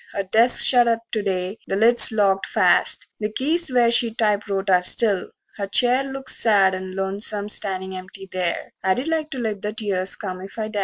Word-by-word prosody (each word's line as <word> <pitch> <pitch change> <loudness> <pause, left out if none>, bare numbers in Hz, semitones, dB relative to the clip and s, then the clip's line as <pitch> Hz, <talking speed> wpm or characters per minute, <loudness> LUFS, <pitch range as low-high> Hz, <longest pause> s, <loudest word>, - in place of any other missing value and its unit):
Her 200 - -2
desk's 225 +6 +4
shut 245 -2 +4
up 230 0 0
to 215 - -1
day, 190 0 -3
the 195 - -2
lid's 230 +3 +5
locked 200 -3 +1
fast; - - +1
The 210 -1 -3
keys 310 +6 0
where 240 -2 +3
she 235 -1 +2
typewrote 205 -3 -1
are 180 -2 +3
still; 200 +1 +1 0.3
her 200 -2 -4
chair 245 +6 +3
Looks 270 0 -4
sad 200 -4 +3
and 185 0 -7
lonesome 200 +2 -1
standin' 190 -2 -1
empty 190 +1 -9
there 180 -2 -3
I'd 190 +10 -1
like 320 -1 -2
to 270 - -7
let 220 -5 -4
the 210 +1 -4
tears 195 -4 -3
come 185 -2 -7
if 195 +3 -11
I 215 -1 -4
dast. 210 -1 -4
210 Hz, 200 wpm, -21 LUFS, 190-235 Hz, 0.3 s, lid's